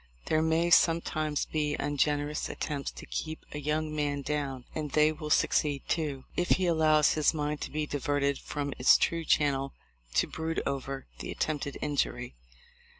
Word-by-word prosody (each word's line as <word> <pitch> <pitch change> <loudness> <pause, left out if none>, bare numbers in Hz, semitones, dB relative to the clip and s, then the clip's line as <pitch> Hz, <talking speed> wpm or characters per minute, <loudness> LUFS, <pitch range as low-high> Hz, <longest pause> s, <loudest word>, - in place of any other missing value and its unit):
There 155 - +2
may 160 +2 +2
some 165 -1 +6
times 155 -3 -2
be 150 -1 -1
ungenerous 145 +1 0
attempts 145 -2 -3
to - - -10
keep 155 0 -5
a 150 - -5
young 155 +1 -1
man 145 -1 -1
down; 140 -3 -3
and 155 -2 -3
they 150 +2 +4
will 155 -1 -6
succeed, 145 -2 +2
too, 145 -5 -1
if 175 - 0
he 185 - 0
allows 155 -3 +4
his 155 +1 +2
mind 150 0 -2
to - - -3
be 155 0 -2
diverted 145 -1 0
from 145 -1 -4
its 125 - +7
true 165 0 0
channel 140 -3 +1 0.4
to - - +4
brood 160 0 -3
over 135 0 -3
the - - -6
attempted 145 -2 -2
injury. 140 - -1
150 Hz, 165 wpm, -29 LUFS, 145-155 Hz, 0.4 s, its